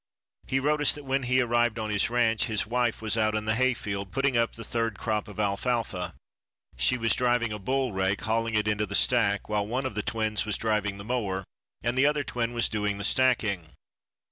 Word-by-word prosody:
He 135 - +1
wrote 150 +2 +1
us 145 - +4
that 145 - -8
when 135 +1 0
he 130 +1 +2
arrived 120 -1 +1
on 110 -1 -3
his 100 +1 +2
ranch, 115 -2 +2
his 110 -4 +1
wife 120 -1 -1
was 110 +1 +1
out 110 0 +2
in 110 0 -2
the 110 - +1
hayfield 110 -5 -1
putting 135 -1 +1
up 115 -1 +2
the 115 - -7
third 115 -2 -2
crop 110 -1 -2
of 105 0 -10
alfalfa. 100 -3 -1 0.6
She 125 - +2
was 115 -2 +2
driving 120 -2 +1
a 105 - -5
bull 130 +3 -1
rake, 95 +1 0
hauling 115 0 0
it 105 0 +1
into 105 0 0
the 100 - -3
stack, 105 -4 +2
while 105 -1 -1
one 130 +4 -2
of 130 - -3
the 105 - -2
twins 110 -2 0
was 105 -2 0
driving 105 -3 -1
the 100 - -9
mower 100 -6 -2 0.4
and 120 +1 0
the 135 +2 +4
other 150 -1 +1
twin 120 -3 -2
was 120 -1 +1
doing 105 -2 -1
the 100 - -5
stacking. 100 -9 +1
115 Hz, 220 wpm, -27 LUFS, 105-125 Hz, 0.6 s, us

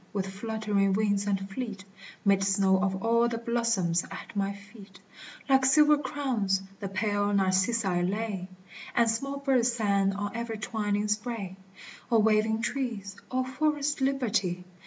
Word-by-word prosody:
with 195 -2 -1
fluttering 200 0 -1
wings 205 -1 +1
and 195 -1 -1
fleet, 205 -3 -5 0.4
Made 195 -1 +4
snow 195 -1 +3
of 190 +1 -1
all 235 +1 +4
the 235 -1 -2
blossoms: 230 -7 0
at - - -9
my 200 0 0
feet, 200 -1 -13 0.5
like 265 -1 +4
silver 300 +3 +6
crowns, 245 -9 -1 0.2
the 200 - -4
pale 205 +1 0
narcissi 190 0 +2
lay, 195 0 -2 0.5
And 235 -1 +4
small 275 +5 -1
birds 260 -3 +2
sang 200 -4 +1
on 205 +1 -4
every 230 -1 -3
twining 210 -1 -1
spray. 210 -3 -3 0.6
O 230 - +5
waving 220 +1 +2
trees, 225 -9 -3
O 255 0 0
forest 290 +2 -1
liberty 215 -10 0
210 Hz, 140 wpm, -28 LUFS, 195-235 Hz, 0.6 s, silver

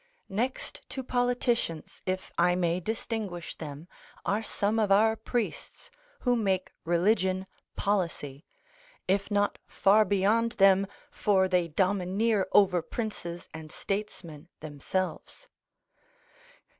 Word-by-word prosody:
Next 235 +7 -2
to 265 0 -4
politicians, 245 -9 -1
if 185 0 -2
I 175 +1 +3
may 175 -1 +1
distinguish 215 -3 -4
them, 150 +1 -8 0.4
are 205 +2 +1
some 215 0 0
of 210 -2 +1
our 220 +3 +5
priests 225 0 -4 0.3
(who 245 -1 +2
make 195 -5 0
religion 185 +2 +2 0.3
policy), 170 -8 -2 0.6
if 200 +2 +1
not 205 -1 +1
far 210 +2 +4
beyond 215 +3 +2
them, 195 0 +5 0.2
for 190 -2 +2
they 180 -2 +2
domineer 195 +4 +1
over 185 -4 +5
princes 175 -3 -5
and 160 -1 -9
statesmen 175 -6 -5
themselves. 180 - -4
195 Hz, 105 wpm, -29 LUFS, 175-220 Hz, 0.6 s, our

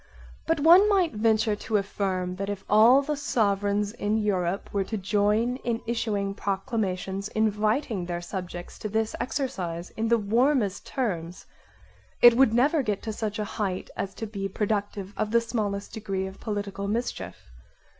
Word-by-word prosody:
But 325 -1 +2
one 350 +7 +7
might 375 - +2
venture 220 0 +2
to 210 +1 -1
affirm 190 -2 -2
that 195 +1 -3
if 200 -1 -5
all 235 +6 +6
the 300 +2 -1
sovereigns 205 -6 0
in 215 -2 -1
Europe 195 -3 0
were 200 -1 +1
to 220 - -3
join 210 +5 +1
in 235 -3 -2
issuing 215 -4 -1
proclamations 195 -1 -2
inviting 215 -1 0
their 175 -1 -3
subjects 175 0 -7
to 215 - -4
this 220 +1 -1
exercise 185 - -3
in 225 +1 -2
the 235 +1 +4
warmest 225 0 +1
terms, 180 -9 -3 0.7
it 240 -1 +8
would 260 -2 +5
never 280 +7 +3
get 210 -6 -2
to 220 - -3
such 210 -1 -3
a 210 - -2
heighth 200 -3 -3
as 195 -1 -4
to 225 - -4
be 200 -2 -4
productive 205 -1 -2
of 215 - -1
the 235 +2 +4
smallest 210 -4 -3
degree 195 -3 -3
of 190 +1 -9
political 205 -2 -4
mischief. 225 - -4
210 Hz, 160 wpm, -26 LUFS, 195-230 Hz, 0.7 s, it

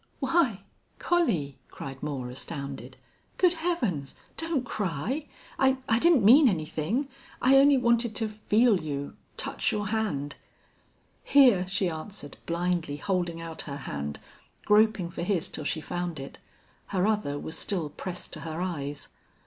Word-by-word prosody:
"Why 270 - +2 0.3
Collie!" 195 - +1
cried 135 -1 -8
Moore, 140 -4 -3
astounded. 140 +1 -6 0.4
"Good 360 -2 +4
Heavens! 255 - -2 0.2
Don't 325 -6 -1
cry! 210 - -2 0.3
I 265 0 +4
I 225 0 +3
didn't 315 - +5
mean 265 +5 +8
anything. 175 - -1 0.3
I 265 +2 +5
only 280 0 +6
wanted 235 -2 +2
to 225 - 0
feel 215 0 +2
you 145 -2 -4 0.2
touch - - -1
your 205 -1 -2
hand." 175 -11 -2 0.9
"Here," 245 -10 +5
she 190 0 0
answered, 160 -2 -7
blindly 170 -3 -1
holding 175 -1 -1
out 165 -1 -6
her 140 - -4
hand, 75 - -5 0.5
groping 210 -4 +4
for - - -6
his 180 -1 0
till 150 - -6
she 160 - -1
found 175 -2 -4
it. 135 - -8 0.5
Her 190 -1 0
other 210 -10 0
was 160 +2 -5
still 170 -8 -2
pressed 180 +2 -6
to - - -5
her 160 0 -5
eyes. 145 -6 -4
185 Hz, 140 wpm, -28 LUFS, 155-235 Hz, 0.9 s, mean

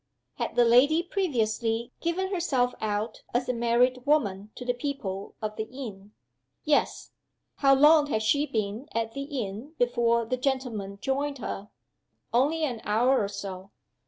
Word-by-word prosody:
Had - - -3
the 240 - +5
lady 280 +8 +5
previously 235 - -1
given 375 +3 -1
herself 260 -9 +1
out 215 +1 -2
as 250 +1 +1
a 250 - +1
married 245 +2 +2
woman 210 -9 +1
to 250 - -8
the 245 - +1
people 240 -7 -4
of 215 0 -3
the 220 - -2
inn?" 220 -5 -9 0.5
"Yes." 300 -1 +1 0.5
"How 275 -1 +5
long 295 +2 +6
had 220 -6 -1
she 285 +7 +2
been 220 +5 -3
at 225 0 -1
the 275 +4 -5 0.2
inn 220 +11 -8
before 235 -1 +2
the 255 +3 -1
gentleman 250 -7 -2
joined 280 +1 -1
her?" 205 -3 -5 0.6
"Only 295 +7 +2
an 245 -7 -2
hour 245 +5 +3
or - - -1
so." 195 -1 -7
245 Hz, 155 wpm, -27 LUFS, 215-280 Hz, 0.6 s, long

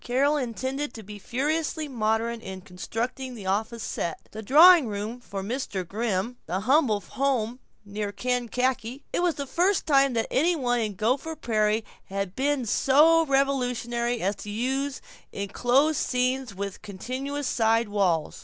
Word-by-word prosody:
Carol 275 +5 +2
intended 265 +2 -3
to 220 - -8
be 205 +1 -10
furiously 305 - -1
modern 230 -2 -1
in 190 -3 -7
constructing 240 +8 -5
the 205 -4 -9
office 220 +4 -1
set, 170 - -4
the 215 - -7
drawing 315 - +7
room 215 +3 -4
for 195 -4 -6
Mr. 200 -5 -3
Grimm, 205 -1 -1
and 245 +1 -10
the 180 +4 -1
Humble 250 -3 +3
Home 250 -3 -1 0.3
near 205 0 -4
Kankakee. 250 +3 -1
It - - +1
was 355 -2 +1
the 280 - -4
first 360 +7 +1
time 275 -3 +4
that 225 -1 0
any 340 +6 +3
one 245 -5 0
in 215 -3 -2
Gopher 260 - 0
Prairie 215 -3 0 0.2
had 195 -1 -4
been 275 -1 0
so 310 +8 +4
revolutionary 245 -3 0
as 200 +2 0
to 210 - -8
use 265 +5 -2 0.3
enclosed 245 +9 +1
scenes 255 -3 -1
with 200 0 -5
continuous 260 +8 -5
side 225 -1 +2
walls. 185 -7 0
240 Hz, 155 wpm, -26 LUFS, 210-275 Hz, 0.3 s, drawing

